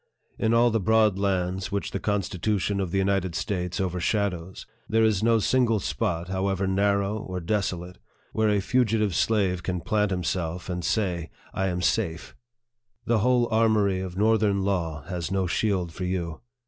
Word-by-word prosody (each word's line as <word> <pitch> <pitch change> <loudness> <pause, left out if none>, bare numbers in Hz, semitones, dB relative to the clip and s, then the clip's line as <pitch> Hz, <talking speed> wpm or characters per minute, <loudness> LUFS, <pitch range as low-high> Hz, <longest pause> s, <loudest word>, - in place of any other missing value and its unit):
In 110 - +2
all 120 +1 +4
the 115 - +1
broad 110 -1 +3
lands 95 0 -1
which 100 0 -2
the - - -3
Constitution 100 0 -1
of 95 -2 -1
the 95 - -1
United 95 -2 0
States 90 -3 -2
over 90 -1 -1
shadows, 95 -2 -2 0.2
there 110 0 +3
is 110 -3 +2
no 115 +1 +4
single 115 0 +2
spot, 85 -2 -2
however 95 +1 -1
narrow 100 +2 +1
or 90 -2 -5
desolate, 90 -1 -2 0.3
where 110 -1 +2
a 105 -1 +2
fugitive 110 -3 +1
slave 95 -2 +1
can 90 0 -2
plant 105 +4 0
himself 90 -1 -2
and 90 -1 -3
say, 90 -5 -1
" - - -26
I 95 - 0
am 90 -1 -2
safe." 80 -1 -1 0.7
The 115 -2 +2
whole 125 +1 +3
armory 110 -4 +3
of 95 -1 -5
North 110 +1 +3
ern 100 -2 +2
Law 85 -7 -1
has 90 -2 -4
no 95 -1 0
shield 90 -2 0
for 90 - -4
you. 90 -2 -3
95 Hz, 175 wpm, -26 LUFS, 90-105 Hz, 0.7 s, all